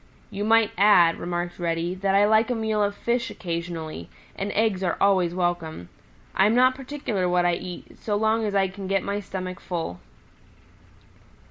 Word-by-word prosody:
"You 200 - -3
might 225 0 +4
add," 180 -5 +5
remarked 175 0 -4
Reddy, 170 0 -1
"that 195 +1 0
I 200 +1 +5
like 220 +2 +3
a 245 - 0
meal 220 -1 0
of 205 0 0
fish 235 +2 -1
occasionally, 165 - -5 0.3
and 200 +1 -3
eggs 215 -3 +1
are 175 - 0
always 185 -3 +3
welcome. 175 - -2 0.4
I 190 - +4
am 220 - +2
not 255 +1 +5
particular 255 -8 -3
what 175 0 +2
I 175 - +3
eat 175 +1 -7
so 210 - -2
long 220 +2 +1
as 205 -2 -2
I 195 -1 +3
can 190 +1 -8
get 195 -1 +1
my 200 +1 -2
stomach 185 -2 -6
full." 165 - -4
195 Hz, 175 wpm, -25 LUFS, 175-215 Hz, 0.4 s, add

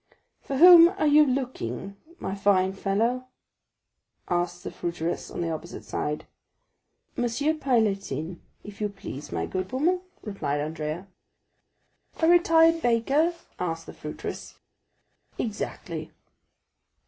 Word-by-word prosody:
"For 275 - -4
whom 340 +1 +10
are 385 -4 -2
you 300 0 +7
looking, 220 - -3 0.2
my 190 - -4
fine 195 -1 +2
fellow?" 225 +6 0 1.0
asked 175 0 -1
the - - -5
fruiteress 170 0 -3
on - - -5
the 165 -1 -1
opposite 160 - -7
side. 150 0 -3 0.9
"Monsieur 245 +6 0
Pailletin, 195 - -1 0.2
if 205 0 -11
you 210 - 0
please, 175 -7 -8
my - - -2
good 185 0 -4
woman," 340 +8 +1 0.2
replied 195 -9 -2
Andrea. 155 +3 -4 1.1
"A 320 - +3
retired 330 -1 +5
baker?" 275 +8 +2 0.2
asked 165 -2 -3
the - - -10
fruiteress. - - -7 0.8
"Exactly." 215 -2 -4
205 Hz, 110 wpm, -26 LUFS, 175-285 Hz, 1.1 s, whom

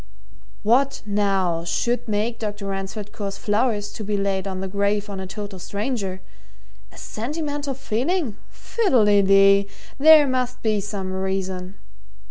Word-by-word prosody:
"What, 265 +6 +2
now, 195 -5 +1
should 240 +9 -1
make 215 +2 -1
Dr. 205 -2 -4
Ransford 195 +2 -5
cause 200 -3 -5
flowers 210 -1 0
to 215 - -7
be 205 0 -1
laid 195 -1 -1
on 190 -1 -4
the 190 - -3
grave 200 +1 0
of 195 - -5
a 190 - -5
total 200 -1 -7
stranger? 200 -1 -3 0.7
A - - -16
sentimental 290 +3 -4
feeling? 270 - -1
Fiddle 330 - +1
de 205 -1 +5
dee! 195 0 +5 0.3
There 310 +1 +8
must 255 -1 -2
be 215 -2 +1
some 195 -2 -4
reason." 190 0 -3
205 Hz, 140 wpm, -23 LUFS, 195-240 Hz, 0.7 s, There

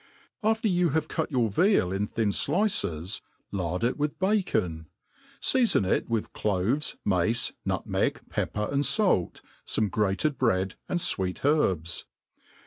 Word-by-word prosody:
AFTER 220 +1 +1
you 180 -3 +2
have 155 -1 -1
cut 160 - -2
your 120 -5 +1
veal 175 - +3
in 100 +2 -1
thin 110 -1 0
flices, 125 - 0 0.3
lard 90 0 -2
it 125 +5 0
wifh 150 0 -1
hacon; 180 - 0 0.6
feafon 240 - +3
it - - 0
with 115 -2 -2
cloves, 105 +9 0
mace, 100 +4 +1
nutmeg, - - -1
pepper 105 0 -2
and 140 0 +1
fait, 140 - +1 0.2
Ibme 105 -3 0
grated 105 - 0
bread, 95 -6 +1 0.2
and 180 - 0
fweet 95 - 0
herbs. 95 - +1
115 Hz, 135 wpm, -27 LUFS, -, 0.6 s, veal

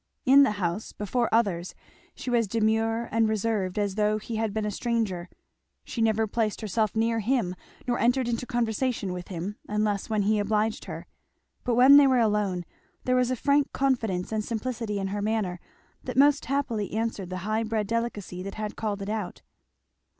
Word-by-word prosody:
In 275 +2 +8
the 275 -7 +4
house, 180 +2 -2
before 235 +4 -1
others, 190 -6 +1 0.4
she 250 - -5
was 235 -2 +3
as - - -10
demure 225 +2 +1
and 225 -1 +2
reserved 215 -3 -1
as 205 -2 0
though 210 +1 +1
he 220 +1 -5
had 220 -1 0
been 215 +1 -2
a 210 - -1
stranger; 210 -7 -2 0.5
she 235 - -4
never 220 0 +3
placed 220 0 -1
herself 215 0 0
near 225 +1 +1
him, 220 -4 0 0.3
nor 245 - 0
entered 245 +1 +2
into 240 +1 -2
conversation 230 -4 -1
with 180 -1 -6
him, 190 +3 -5
unless 210 -1 0
when 215 -2 +1
he 210 +1 +2
obliged 215 +1 0
her; - - -7 0.6
but 245 -2 +1
when 260 +4 +8
they 285 -1 +7
were 260 -1 +4
alone 210 -6 +1 0.4
there 255 - +1
was 250 -1 +2
a 255 - +1
frank 280 +3 +2
confidence 225 -10 0
and 215 -1 -1
simplicity 230 -1 -3
in 195 -1 -2
her 205 +1 -3
manner 205 -4 -1 0.4
that - - -5
most 285 +1 +5
happily 260 -8 -1
answered 220 -4 -2
the 185 - -4
high 215 +1 0
bred 220 -1 -1
delicacy 210 -5 -3
that 195 +1 -6
had 215 -1 -4
called 205 -3 -3
it 200 - -5
out. 215 -3 -4
220 Hz, 185 wpm, -27 LUFS, 205-235 Hz, 0.6 s, In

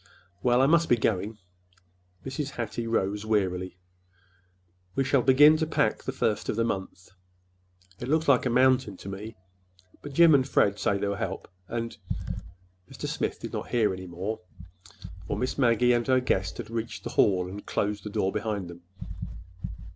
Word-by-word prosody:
Well, 125 +1 +4
I - - +6
must 170 +3 +4
be 120 - +5
going." 105 -1 -1 0.9
Mrs. 135 +2 -3
Hattie 115 0 -3
rose 105 -2 0
wearily. 95 -4 -1 1.2
"We 135 - +2
shall 135 0 +3
begin 145 +5 +7
to 160 0 -1
pack - - +1
the - - -3
first 105 - -1
of - - 0
the 115 - +1
month. 95 -4 -4 0.9
It 120 - -5
looks 160 +3 +1
like 130 -2 +4
a - - +1
mountain 130 -4 +3
to 100 - -8
me, 105 +3 -7 0.7
but 145 - -8
Jim 170 +2 +7
and 135 -2 +4
Fred 100 -5 +3
say 100 - +1
they'll 100 0 -1
help, 95 -1 -4 0.2
and—" 115 +1 -4 0.9
Mr. - - -7
Smith - - -2
did - - -7
not - - -4
hear 110 -5 +2
any 95 0 -7
more, 95 +6 -4 0.9
for - - -2
Miss 130 +2 -2
Maggie 125 -1 +4
and 120 -1 0
her 130 -1 +4
guest 95 -7 -1
had - - -7
reached 115 0 -4
the - - -5
hall 95 -3 +3
and 95 +3 -7
had - - -15
closed 105 0 -1
the 105 - -5
door 95 -1 0
behind 105 -4 -3
them. 85 0 -13
115 Hz, 175 wpm, -27 LUFS, 100-130 Hz, 1.2 s, begin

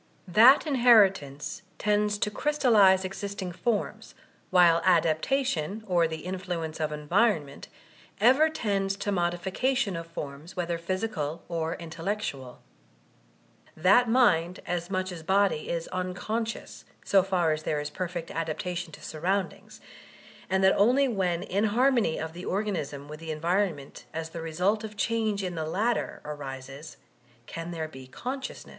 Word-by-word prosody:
That 230 - +7
inheritance 205 - +3 0.2
tends 210 0 +1
to 210 - -1
crystallize 210 -10 +4
existing 195 -1 -5
forms, 210 +4 -3 0.3
while 175 -2 +5
adaptation, 185 - +1
or 175 -4 +2
the 160 -1 -6
influ 180 -2 -3
ence 160 0 -8
of 155 -1 -1
environment, 150 -1 0 0.5
ever 265 +9 +5
tends 200 -10 -1
to 200 +1 -3
modification 190 +6 0
of 165 0 -6
forms, 150 0 -8
whether 175 -2 -2
physical 170 -4 -3
or 165 -1 -2
intellectual 165 -6 -5 1.1
That 200 +9 +5
mind 185 -8 +3
as 175 0 -3
much 185 -1 -2
as 170 -2 -7
body 190 -2 +1
is 170 -1 -2
unconscious, 185 +5 -4 0.2
so 195 - +5
far 180 -4 +1
as 155 0 -1
there 150 -1 -1
is 150 0 -5
perfect 175 -1 -4
adapta 165 +2 -3
tion 175 -1 -5
to - - -12
surroundings; 185 +5 -3 0.7
and 190 0 +1
that 190 - +6
only 255 +7 +4
when 185 -7 -1
inharmony 220 0 +2
of 160 0 -5
the 175 +1 -8
organism 170 -9 -3
with 150 +1 -9
the 165 0 -8
environment 165 -2 -2
as 160 0 -4
the 165 - -6
result 180 +7 0
of 215 -1 -8
change 215 -2 0
in 180 -1 -3
the 160 -2 -3
latter, 220 +8 -1
arises, 140 0 -8 0.5
can 165 +5 -6
there 165 -2 -4
be 130 -4 -12
co$uciontn€U. 260 - -6
180 Hz, 140 wpm, -27 LUFS, 160-210 Hz, 1.1 s, That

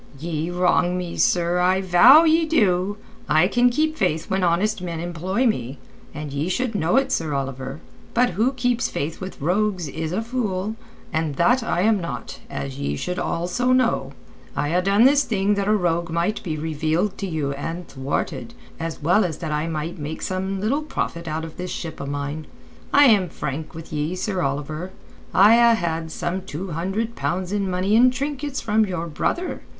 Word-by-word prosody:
"Ye 160 +1 -3
wrong 180 0 +2
me, 180 -2 -4
sir, 175 0 +2
I 185 +1 +3
vow 190 - +7
ye 325 0 +4
do! 205 - +2 0.3
I 155 +4 +5
can 245 +4 +3
keep 310 +5 0
faith 160 - -1
when 190 0 +1
honest 185 +4 +1
men 170 -2 -4
employ 175 +7 -1
me, 135 - -1 0.3
and 145 -1 -6
ye 145 +5 -1
should 245 +5 -1
know 175 -4 +1
it, 270 0 +2
Sir 160 - -1
Oliver. 135 +1 -4 0.3
But 245 -1 +3
who 220 +9 +1
keeps 245 -2 0
faith 155 +6 -4
with 190 0 -7
rogues 185 +2 0
is 160 +3 -4
a 205 +5 -1
fool—and 205 - -3
that 245 - +3
I 220 -6 0
am 210 -1 +3
not, 170 - -6
as 70 -1 -5
ye 70 0 -1
should 180 - -3
also 180 +10 0
know. 230 - +1 0.4
I 145 - 0
ha' 180 +1 +2
done 200 +3 +4
this 280 +2 +5
thing 205 -2 +1
that 200 -1 -1
a 215 - +4
rogue 170 -2 0
might 170 +6 -1
be 160 -6 -3
revealed 160 +5 -1
to 195 - -2
you 155 -5 -2
and 165 +5 -5
thwarted, 135 +1 -4 0.2
as 165 -2 -5
well 180 +7 +4
as 165 -5 -2
that 160 -3 -5
I 150 +2 -1
might 165 +2 -4
make 150 +2 -5
some 190 +1 -2
little 240 +9 0
profit 170 - -4
out 160 +1 -3
of 160 - -11
this 180 0 -4
ship 165 -2 -5
o' 140 - -5
mine. 145 +2 -4 0.4
I 285 0 +7
am 205 -8 +4
frank 155 +1 -5
with 160 0 -9
ye, 155 +4 -1
Sir 185 0 -2
Oliver. 150 +4 -3 0.4
I 205 +4 +7
ha' 235 -1 +6
had 165 -3 -2
some 175 +4 -3
two 185 0 -6
hundred 195 +8 -2
pounds 180 +1 -2
in 200 -2 -1
money 185 +3 +1
and 250 +2 +6
trinkets 280 +1 -3
from 215 -1 +2
your 180 -3 -3
brother. 345 - -2
180 Hz, 190 wpm, -23 LUFS, 160-215 Hz, 0.4 s, vow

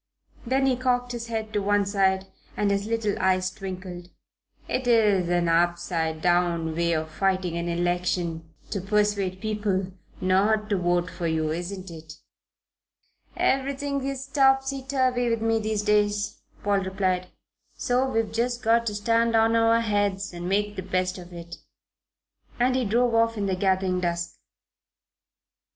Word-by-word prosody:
Then 265 +2 +2
he 265 -1 +3
cocked 245 -1 0
his 235 -1 -5
head 220 -2 -4
on 205 - +1
one 205 0 +2
side 190 -1 +1 0.3
and 205 -1 +1
his 200 +1 -1
little 225 -2 0
eyes 185 0 +2
twinkled: 185 -2 -7 0.6
"It's 255 -1 -2 0.4
an 175 -1 +2
upside 165 -1 0
down 175 -2 +2
way 170 0 +1
of 155 0 -2
fighting 185 -1 0
an 170 0 -2
election 175 -1 -1 0.2
to 200 - -2
persuade 200 -2 0
people 205 -3 -1 0.3
not 210 +3 +2
to 200 - +3
vote 175 0 0
for 170 - -3
you, 160 -1 0
isn't 180 +2 -5
it?" 160 -1 -10 1.2
"Everything 275 +1 0
is 270 -1 -3
topsy 270 -1 +2
turvy 255 -2 +1
with 230 -1 0
me, 225 0 +2
these 215 -1 -1
days," 210 -1 +1 0.2
Paul 200 -1 +2
replied: 190 -1 -1 0.5
"so 255 +2 +1
we've 225 -3 0
just 240 +1 -1
got 230 +1 +3
to 210 - -2
stand 230 +2 +2
on 225 0 +4
our 230 0 +4
heads 205 -3 0
and 175 +1 -5
make 205 +1 0
the - - -2
best 185 0 -1
of 175 0 -11
it." 170 -1 -9 1.0
And 255 +1 +3
he 255 -2 +1
drove 235 +3 +2
off 230 0 +2
in 205 - -1
the 190 -1 0
gathering 185 -1 +1
dusk. 170 -1 -2
200 Hz, 150 wpm, -25 LUFS, 180-230 Hz, 1.2 s, on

